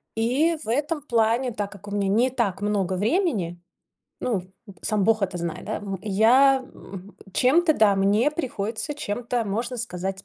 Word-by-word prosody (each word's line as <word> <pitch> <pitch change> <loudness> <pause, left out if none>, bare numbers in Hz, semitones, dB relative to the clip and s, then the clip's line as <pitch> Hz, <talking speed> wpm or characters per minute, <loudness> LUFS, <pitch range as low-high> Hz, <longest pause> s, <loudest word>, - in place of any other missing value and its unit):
И 275 +9 +1
в - - -11
этом 295 +4 -1
плане, 235 0 +1
так 205 -2 -4
как 200 0 -13
у - - -7
меня 200 -1 0
не 235 +6 +3
так 205 -7 -1
много 195 -3 0
времени, 205 - 0 0.6
ну, 205 -8 -1 0.4
сам 210 -3 0
бог 220 0 +2
это 190 -2 -1
знает, 170 -1 -4
да - - -3
в 195 -2 -5
я 245 +7 +4
м 195 -2 -12 0.2
чем-то, 315 +5 +4
да, 205 -3 +4
мне 205 +8 +3
приходится 240 -2 -4
чем-то, 240 -3 -2
можно 230 +5 -3
сказать, 195 -3 -4
220 Hz, 165 wpm, -24 LUFS, 195-255 Hz, 0.6 s, я